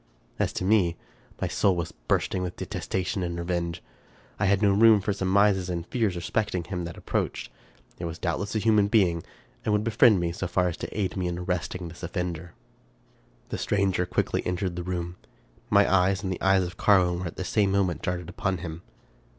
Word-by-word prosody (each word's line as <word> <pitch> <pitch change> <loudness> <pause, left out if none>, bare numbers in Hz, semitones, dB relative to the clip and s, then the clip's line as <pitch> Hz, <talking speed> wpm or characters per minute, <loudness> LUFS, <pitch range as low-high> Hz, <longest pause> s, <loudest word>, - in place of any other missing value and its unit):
As - - +1
to - - -3
me, 95 -5 +3 0.4
my - - 0
soul 95 -2 +2
was 85 -2 -3
bursting 80 +7 -1
with 90 -1 -4
detestation 95 +1 -3
and 85 -1 -3
revenge. 85 -1 -2 0.6
I - - +2
had 100 +1 +3
no 100 - +5
room 110 +1 +6
for 100 +1 -1
surmises 95 -1 +2
and 85 -1 -3
fears 110 -5 0
respect 105 +4 -1
ing 90 - -1
him 90 -1 -4
that 85 - -7
approached. - - -3 0.5
It 85 - -4
was 85 0 -5
doubtless 95 +5 -2
a - - +3
human 105 -1 +3
being, 95 -6 +3 0.4
and - - 0
would 105 0 +2
befriend 110 -2 +5
me 85 -1 -1
so 90 +2 -3
far 90 0 +1
as 85 - -6
to - - -5
aid 95 -4 -1
me 90 -1 -1
in 85 0 -3
arresting 90 0 -3
this 85 +1 -11
offender. 90 -2 -4 0.9
The - - -4
stranger 95 -3 +1
quickly - - 0
entered 90 0 -2
the 90 - -3
room. 85 0 -4 0.5
My - - +5
eyes 95 +1 +2
and 95 - -2
the - - -8
eyes 95 0 +4
of 90 +1 -6
Carwin 90 -4 +4
were 90 - -3
at 85 - -8
the - - -4
same 100 +1 +1
moment 95 -3 +1
darted 90 -2 -3
upon 95 0 -2
him. 80 -1 -7
90 Hz, 200 wpm, -27 LUFS, 85-100 Hz, 0.9 s, room